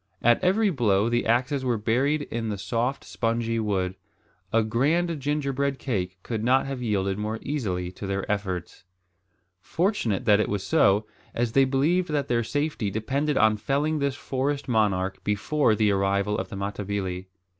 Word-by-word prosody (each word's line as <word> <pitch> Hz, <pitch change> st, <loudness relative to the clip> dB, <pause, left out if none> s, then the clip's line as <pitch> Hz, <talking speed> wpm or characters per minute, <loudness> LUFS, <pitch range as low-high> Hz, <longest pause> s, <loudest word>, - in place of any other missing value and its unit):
At 120 Hz, +8 st, +4 dB
every 200 Hz, +3 st, +3 dB
blow 110 Hz, -, +2 dB
the 120 Hz, -1 st, 0 dB
axes 130 Hz, +4 st, +1 dB
were 125 Hz, -3 st, +1 dB
buried 130 Hz, +8 st, +1 dB
in 115 Hz, -4 st, -4 dB
the 105 Hz, -, -3 dB
soft 120 Hz, +6 st, -2 dB
spongy 115 Hz, 0 st, -1 dB
wood. 95 Hz, -4 st, 0 dB, 0.6 s
A 115 Hz, 0 st, +3 dB
grand 150 Hz, +9 st, +1 dB
gingerbread 140 Hz, -1 st, -1 dB
cake 95 Hz, -9 st, -3 dB
could 110 Hz, -2 st, -3 dB
not 130 Hz, +3 st, +3 dB
have 135 Hz, -2 st, -4 dB
yielded 100 Hz, -4 st, 0 dB
more 110 Hz, +1 st, -2 dB
readily 95 Hz, -11 st, -2 dB
to 95 Hz, +2 st, -7 dB
their 100 Hz, 0 st, -2 dB
efforts. 95 Hz, -4 st, -3 dB, 0.8 s
Fortunate 165 Hz, -, -1 dB
that 105 Hz, -2 st, +5 dB
it -, -, +1 dB
was 100 Hz, -1 st, -2 dB
so, 100 Hz, +1 st, +3 dB, 0.3 s
as 120 Hz, -1 st, 0 dB
they 135 Hz, +3 st, +5 dB
believed 155 Hz, +7 st, +1 dB
that 145 Hz, -2 st, -1 dB
their 120 Hz, -1 st, +2 dB
safety 145 Hz, -3 st, -1 dB
depended 135 Hz, +8 st, -1 dB
on 110 Hz, -1 st, +4 dB
felling 145 Hz, +7 st, 0 dB
this 140 Hz, -1 st, 0 dB
forest 140 Hz, +1 st, -2 dB
monarch 100 Hz, -5 st, 0 dB
before 110 Hz, +4 st, +1 dB
the 105 Hz, -1 st, +2 dB
arrival 100 Hz, +1 st, +1 dB
of -, -, -3 dB
the 110 Hz, -, -7 dB
Matabili. 100 Hz, -2 st, -3 dB
115 Hz, 165 wpm, -26 LUFS, 100-140 Hz, 0.8 s, that